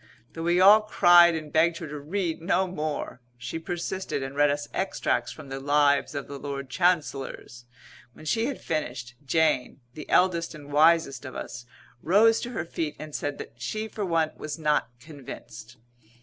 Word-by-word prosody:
Though 165 - -6
we 175 +2 +2
all 205 +3 +8
cried 175 -5 +6
and 155 -2 -6
begged 165 +1 +3
her 165 - -7
to 150 0 -6
read 165 +2 -3
no 185 +2 +1
more, 155 -7 -4 0.2
she 125 +6 -5
persisted 170 -3 -4
and 135 +1 -6
read 145 0 +4
us 145 0 -2
extracts 190 0 -1
from 150 -3 -11
the 135 0 -5
Lives 145 +1 +2
of 140 - -3
the 140 -1 -8
Lord 140 -2 -6
Chancellors. 145 -8 -1 0.5
When 155 - -14
she 225 +8 +1
had 280 - -4
finished, 125 -6 -4
Jane, 145 -3 +1
the 150 - -10
eldest 170 -3 +2
and 145 -1 -11
wisest 155 -3 +4
of 130 -2 -8
us, 120 0 -7 0.3
rose 220 +6 +4
to 240 - -5
her 210 -9 -4
feet 160 -2 -4
and 155 -1 -9
said 145 0 -3
that 120 +1 -10
she 215 - -3
for 215 -1 -5
one 165 -4 +1
was 155 +1 -6
not 150 -6 +1
convinced. 125 -4 -11
155 Hz, 175 wpm, -26 LUFS, 140-175 Hz, 0.5 s, all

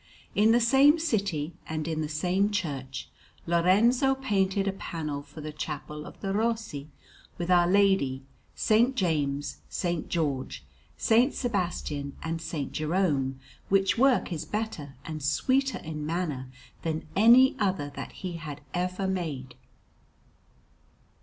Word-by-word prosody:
In 215 +2 +4
the 235 - +5
same 270 +6 +6
city, 200 - -1 0.2
and 155 0 -3
in 160 -1 -1
the 155 - -3
same 180 +6 +1
church, 135 -10 -3 0.4
Lorenzo 210 +11 +4
painted 200 -6 0
a 195 - +1
panel 155 -6 -4
for 145 +2 -11
the 155 0 -5
Chapel 150 0 -5
of - - -12
the 195 0 -2
Rossi, 220 -10 -1 0.5
with 175 +1 -2
Our 175 -1 +5
Lady, 190 -9 +3 0.3
S. - - -2 0.2
James, 145 - 0
S. 175 -2 -1
George, 145 -6 -2 0.3
S. 240 +5 +3
Sebastian, 175 - -2
and 165 0 -2
S. 160 -3 -3
Jerome; 150 -5 0 0.3
which 195 +2 +3
work 260 -8 +3
is 160 - -3
better 210 -10 -4
and 155 -1 -5
sweeter 260 - +1
in 155 -1 -6
manner 150 -5 -2 0.3
than 160 -1 -2
any 245 +7 +7
other 185 -8 0
that - - -6
he 175 -3 -6 0.3
ever 180 +2 -1
made. 150 -9 -3
175 Hz, 130 wpm, -28 LUFS, 150-205 Hz, 0.5 s, any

